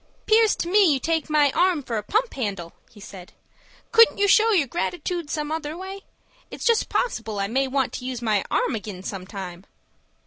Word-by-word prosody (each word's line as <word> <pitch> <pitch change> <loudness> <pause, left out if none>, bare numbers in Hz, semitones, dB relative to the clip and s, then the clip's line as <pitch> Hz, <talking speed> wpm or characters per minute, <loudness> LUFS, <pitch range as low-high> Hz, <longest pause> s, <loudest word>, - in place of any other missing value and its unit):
"'Pears 440 -1 +4
to - - -3
me 385 -2 +5
you 275 - +1
take 320 +1 -1
my 295 -2 +3
arm 355 -3 +1
for 235 - -4
a 215 - -1
pump 440 - -1
handle," 195 -9 -4 0.3
said 190 -2 -11
he. - - -31
"Couldn't 455 0 +6
you 405 - +2
show 440 +3 +5
your 355 -9 +3
gratitood 345 +2 -3
some 300 0 -3
other 315 0 -4
way? 380 +2 -7 0.5
It's - - -7
just 465 -2 +2
possible 225 - -2
I 195 - 0
may 265 +5 0
want 265 -1 -1
to 250 - -6
use 255 -2 -4
my 215 -4 0
arm - - 0
ag'in 205 -4 -7
some 190 -2 -6
time." 185 -3 -8
290 Hz, 200 wpm, -23 LUFS, -, 0.5 s, Couldn't